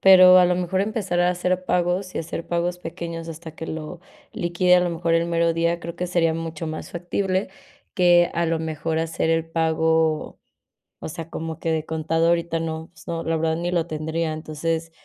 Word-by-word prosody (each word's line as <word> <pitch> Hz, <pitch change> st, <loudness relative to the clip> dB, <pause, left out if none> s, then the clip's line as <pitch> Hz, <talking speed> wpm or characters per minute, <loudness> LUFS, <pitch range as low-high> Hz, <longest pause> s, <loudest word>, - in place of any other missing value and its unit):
pero, 185 Hz, -1 st, +9 dB
a 180 Hz, -, +7 dB
lo 180 Hz, 0 st, +3 dB
mejor, 180 Hz, +1 st, 0 dB
empezar 200 Hz, -4 st, -1 dB
a 175 Hz, 0 st, +4 dB
hacer 180 Hz, +1 st, -1 dB
pagos, 180 Hz, +1 st, 0 dB
y -, -, -2 dB
hacer 165 Hz, +1 st, -5 dB
pagos 175 Hz, +1 st, -1 dB
pequeños 165 Hz, -1 st, -6 dB
hasta 165 Hz, 0 st, -8 dB
que 165 Hz, -, -6 dB
lo 160 Hz, +2 st, -6 dB, 0.3 s
liquide, 180 Hz, +1 st, +3 dB
a -, -, +4 dB
lo 175 Hz, -1 st, 0 dB
mejor, 165 Hz, 0 st, 0 dB
el 165 Hz, 0 st, +2 dB
mero 170 Hz, 0 st, +2 dB
día, 170 Hz, +1 st, 0 dB
creo 170 Hz, 0 st, -7 dB
que 180 Hz, -, -2 dB
sería 165 Hz, -2 st, +2 dB
mucho 165 Hz, -1 st, -4 dB
más 155 Hz, -, -6 dB
factible 185 Hz, +2 st, -1 dB, 0.5 s
que, 175 Hz, -1 st, +5 dB
a 170 Hz, 0 st, 0 dB
lo 165 Hz, 0 st, 0 dB
mejor, 160 Hz, 0 st, -2 dB
hacer 165 Hz, 0 st, -1 dB
el 165 Hz, 0 st, +2 dB
pago, 160 Hz, -1 st, +1 dB, 0.6 s
o -, -, -6 dB
sea, 165 Hz, +1 st, -7 dB
como 160 Hz, -1 st, -5 dB
que 165 Hz, -, -1 dB
de 160 Hz, -1 st, -1 dB
contado 160 Hz, +1 st, 0 dB
ahorita 170 Hz, -1 st, 0 dB
no, 160 Hz, 0 st, -4 dB
pues, 155 Hz, -, -17 dB
no, 165 Hz, -1 st, -3 dB
la 165 Hz, 0 st, 0 dB
verdad 160 Hz, 0 st, +1 dB
ni 175 Hz, +1 st, -2 dB
lo 170 Hz, -2 st, 0 dB
tendría. 160 Hz, +1 st, -2 dB
Entonces, 160 Hz, +1 st, -3 dB
165 Hz, 205 wpm, -23 LUFS, 160-175 Hz, 0.6 s, pero